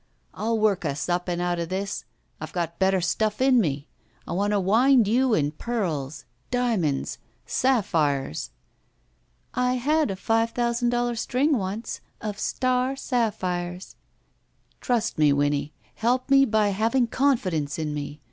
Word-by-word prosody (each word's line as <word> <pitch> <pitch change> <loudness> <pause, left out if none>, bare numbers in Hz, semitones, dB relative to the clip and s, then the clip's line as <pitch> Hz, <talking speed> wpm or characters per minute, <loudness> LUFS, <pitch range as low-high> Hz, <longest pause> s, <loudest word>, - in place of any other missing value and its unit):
I'll 225 +1 -1
work 205 -3 +2
us 140 -2 -2
up 175 +1 0
and 175 -1 -1
out 175 0 0
of 170 -1 -3
this! 195 +1 -3 0.3
I've - - -7
got 170 -2 -3
better 190 -1 +3
stuff 210 +5 0
in 260 -2 +5
me. 145 -5 -2 0.4
I - - -6
want 200 +3 0
to 205 -1 +2
wind 230 +5 +4
you 245 +2 +3
in 145 -1 +1
pearls 155 - -3
— - - -42
diamonds 225 - 0 0.2
— - - -41
sapphires." 160 - +1 1.0
"I 250 0 +1
had 300 +3 +1
a 195 - -2
five 225 +4 +1
thousand 240 0 0
doUar 240 0 0
string 270 +6 +1
once 205 +1 -4 0.2
of 210 -2 -5
star 255 +1 0
sapphires." 185 -8 -2 0.8
Trust 230 -7 -1
me, 150 -1 +5
Winnie. 145 +1 +1 0.2
Help 250 +4 0
me 275 0 +7
by 215 -3 +2
having 230 +5 +1
confi 255 -6 +1
dence 145 -3 -2
in 155 -2 -2
me. 145 0 -5
205 Hz, 155 wpm, -25 LUFS, 170-240 Hz, 1.0 s, me